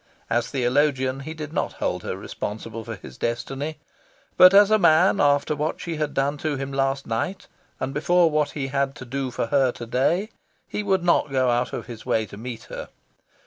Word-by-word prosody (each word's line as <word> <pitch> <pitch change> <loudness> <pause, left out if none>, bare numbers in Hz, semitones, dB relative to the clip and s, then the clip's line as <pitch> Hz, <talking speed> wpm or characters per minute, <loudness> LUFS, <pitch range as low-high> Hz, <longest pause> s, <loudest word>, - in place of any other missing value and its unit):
As 120 0 +1
theologian, 130 0 +1
he 155 +4 -7
did 155 -1 -7
not - - -1
hold - - -2
her - - -4
responsible 110 +2 -6
for 115 0 -6
his 65 -9 -12
destiny. 135 +6 -3 0.6
But 185 0 +9
as 200 +1 +6
a 215 - +5
man, 170 +1 +5
after 145 +1 +3
what 150 +2 -2
she 165 -2 -4
had 150 -1 -2
done 140 +2 0
to 155 -1 -1
him 135 0 -5
last 135 0 0
night, 115 +12 -3 0.3
and 130 +1 -3
before 170 +3 +3
what 150 -1 +1
he 135 -2 -2
had 140 0 0
to 130 - -9
do 135 +2 -3
for 120 - -2
her 135 -3 +4
to 120 - -7
day, 165 - +1 0.4
he - - -3
would 190 -3 +1
not 170 -4 +3
go 130 -2 +2
out 120 +1 0
of - - -5
his 115 -2 -9
way 110 -1 +1
to 100 - -11
meet 115 +2 -7
her. - - -8
140 Hz, 205 wpm, -24 LUFS, 125-155 Hz, 0.6 s, But